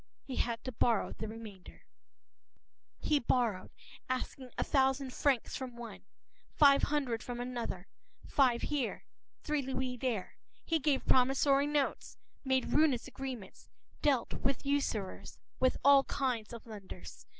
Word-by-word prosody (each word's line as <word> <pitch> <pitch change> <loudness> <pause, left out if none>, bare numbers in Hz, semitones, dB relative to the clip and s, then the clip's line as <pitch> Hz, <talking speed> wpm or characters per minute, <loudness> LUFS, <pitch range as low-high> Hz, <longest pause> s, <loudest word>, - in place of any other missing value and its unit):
He 260 - -6
had 235 -1 -1
to 255 - -4
borrow 230 -2 +1
the 220 - -5
remainder. 215 -4 -10 1.1
He 300 -1 +2
borrowed, 235 -7 0 0.4
asking 255 0 -3
a - - +1
thousand 265 -1 +1
francs 270 -5 +1
from 255 -2 -5
one, 235 -1 -9 0.5
five 280 -2 +7
hundred 265 -6 0
from 245 -1 -5
another, 240 -7 -4 0.4
five 250 -4 +3
here, 280 -6 -2 0.4
three 300 -1 0
louis 260 -1 -3
there. 235 -7 -2 0.3
He 325 -1 +1
gave 285 -2 +1
promissory 275 +2 +4
notes, 295 -2 -1 0.3
made 265 -1 +1
ruinous 290 -6 +3
agreements, 260 -6 -7 0.3
dealt 270 -5 +2
with 270 +1 -1
usurers, 275 -9 -2 0.2
with 255 0 +3
all 280 -1 +8
kinds 245 -6 -1
of 235 -1 -9
lenders. 210 -4 -10
255 Hz, 130 wpm, -33 LUFS, 235-275 Hz, 1.1 s, all